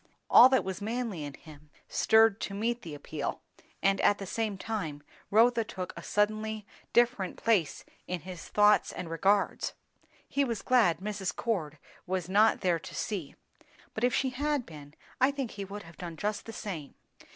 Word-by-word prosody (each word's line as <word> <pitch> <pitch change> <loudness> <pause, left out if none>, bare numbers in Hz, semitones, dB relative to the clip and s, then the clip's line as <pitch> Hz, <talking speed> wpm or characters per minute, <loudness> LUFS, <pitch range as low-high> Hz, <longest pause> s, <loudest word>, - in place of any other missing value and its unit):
All 255 - +10
that 260 - +3
was 190 +1 -5
manly 220 -6 -3
in 145 -1 -6
him 150 -1 -15 0.2
stirred 220 -1 +4
to 195 - -4
meet 235 +3 -1
the 160 -7 -7
appeal, 145 0 -5 0.4
and 195 0 +3
at 205 - +4
the 195 - -6
same 215 +1 -2
time 175 -10 -4 0.3
Rotha 230 +2 +4
took 185 -4 -6
a - - -7
suddenly 215 0 -1 0.3
different 240 -6 +2
place 205 -10 +1 0.2
in 180 -2 -3
his 180 -1 -9
thoughts 210 0 +4
and 170 -3 -6
regards. 195 +5 +1 0.5
He 280 - +1
was 230 -6 -3
glad 205 -10 +3
Mrs. 200 -1 -3
Cord 165 -10 -2 0.3
was 185 -2 -2
not 210 +4 +4
there 175 -4 +2
to - - -10
see; 185 -10 -4 0.6
but 220 - -4
if 250 - +4
she 265 -1 +1
had 285 0 -1
been, 150 -2 -12 0.2
I 260 +1 +5
think 275 -4 -3
he 200 -1 -6
would 205 +2 -8
have 165 0 -15
done 170 -2 -7
just 210 +4 -3
the 225 - -7
same. 170 -10 -6
205 Hz, 175 wpm, -30 LUFS, 175-225 Hz, 0.6 s, All